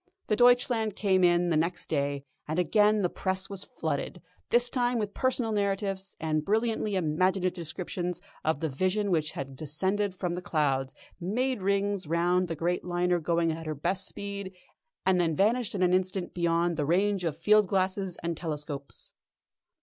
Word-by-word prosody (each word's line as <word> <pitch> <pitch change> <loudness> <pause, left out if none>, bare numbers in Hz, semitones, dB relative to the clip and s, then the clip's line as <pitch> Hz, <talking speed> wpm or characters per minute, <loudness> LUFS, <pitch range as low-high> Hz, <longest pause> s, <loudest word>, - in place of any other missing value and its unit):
The 215 - +3
Deutschland 245 -3 +4
came 190 -3 +2
in 175 0 +4
the - - +3
next 170 +3 0
day, 140 -2 -1 0.2
and 155 +2 -2
again 210 +3 +3
the - - +4
press 190 +1 -3
was 195 -1 -4
flooded, - - -3 0.3
this 240 +1 +4
time 245 -1 0
with 210 -2 -2
personal 255 -3 0
narratives, 195 -1 -1
and 155 -1 0
brilliantly 220 +1 0
imaginative 185 +2 +1
descriptions 175 +1 -4 0.2
of 155 -1 0
the 160 - 0
Vision 185 +8 0
which 155 -3 +1
had 135 -1 -6
descended 190 +8 -1
from 180 -1 -2
the 180 - -4
clouds, 135 -6 0 0.2
made 235 +6 -1
rings 200 -2 0
round 175 +3 +2
the 165 - -3
great 175 +3 -1
liner 175 0 +1
going 165 0 +1
at 160 0 -6
her 155 - -2
best 190 +7 -1
speed, 200 -2 -6 0.5
and 185 -1 +4
then 165 -2 +1
vanished 220 +5 +1
in 185 - +1
an 180 0 +3
instant 185 0 0
beyond 170 -1 +1
the 150 - 0
range 195 +3 +2
of 160 -3 -2
field 210 +4 +4
glasses 190 -1 0
and 170 0 -1
telescopes. 150 -3 -6
180 Hz, 170 wpm, -28 LUFS, 165-200 Hz, 0.5 s, Deutschland